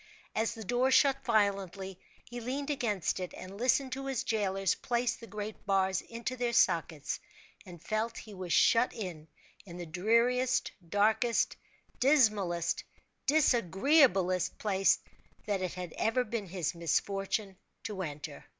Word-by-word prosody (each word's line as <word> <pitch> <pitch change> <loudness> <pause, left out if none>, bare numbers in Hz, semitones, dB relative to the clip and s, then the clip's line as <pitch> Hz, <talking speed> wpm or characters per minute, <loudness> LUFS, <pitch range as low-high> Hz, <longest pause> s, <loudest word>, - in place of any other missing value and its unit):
As 225 +2 0
the 225 - -7
door 245 +5 +1
shut 275 0 +4
violently, 195 -4 0 0.3
he 240 0 -6
leaned 275 +5 -3
against 210 - -1
it, 180 -1 -5
and 190 +2 -9
listened 260 +2 +2
to 270 +1 -4
his 270 -1 -1
jailers 195 -3 0
place 240 0 -1
the 230 - -12
great 210 +1 -6
bars 190 -1 +2
into 235 +2 -5
their 240 -1 -1
sockets, 165 -7 +1 0.5
and 175 -2 -10
felt 220 +1 -2
he 215 - -9
was 185 -2 -6
shut 230 +7 +4
in, 175 -7 -6 0.4
in 175 -3 -10
the 175 - -5
dreariest, 235 +9 +2 0.2
darkest, 220 +4 +2 0.4
dismalest, 215 - +2 0.4
disagreeablest 230 - +3
place 195 -2 +3 0.5
that 205 -3 -1
it 185 -1 -3
had 180 -2 -6
ever 225 +3 +1
been 220 -4 -4
his 175 -3 -2
misfortune 195 +4 -1 0.3
to 205 -3 -4
enter. 150 -3 -6
210 Hz, 140 wpm, -31 LUFS, 185-240 Hz, 0.5 s, shut